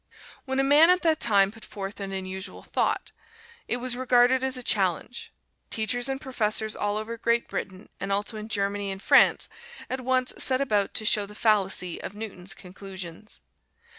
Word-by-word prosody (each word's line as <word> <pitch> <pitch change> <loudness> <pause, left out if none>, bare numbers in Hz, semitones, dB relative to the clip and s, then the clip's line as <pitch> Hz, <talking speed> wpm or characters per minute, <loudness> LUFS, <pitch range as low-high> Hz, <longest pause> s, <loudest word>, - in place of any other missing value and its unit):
When 265 -1 -2
a - - +3
man 295 +5 +6
at 365 0 +4
that 320 -2 +2
time 200 -3 +4
put 225 0 -14
forth 200 +1 -7
an 195 -1 -5
unusual 190 0 -5
thought, - - -1 0.6
it 240 - 0
was 245 0 -1
regarded 255 0 +3
as 265 -1 +1
a 250 - -4
challenge. 195 +2 0 0.4
Teachers 240 +4 0
and 270 0 -2
professors 220 -5 0
all 205 0 -1
over 225 +2 -5
Great 235 +1 +1
Britain, 190 +1 -6
and 195 - -4
also 205 +3 0
in 215 +1 -7
Germany 200 -1 -1
and 195 0 -5
France, - - +4 0.4
at 260 0 -2
once 255 0 +1
set 260 -1 +4
about 210 -7 0
to 215 - +1
show 210 -2 +3
the 210 - -12
fallacy 195 -5 +1
of 200 - -7
Newton's 195 -4 -6
conclusions. 190 +1 -8
215 Hz, 175 wpm, -26 LUFS, 195-250 Hz, 0.6 s, man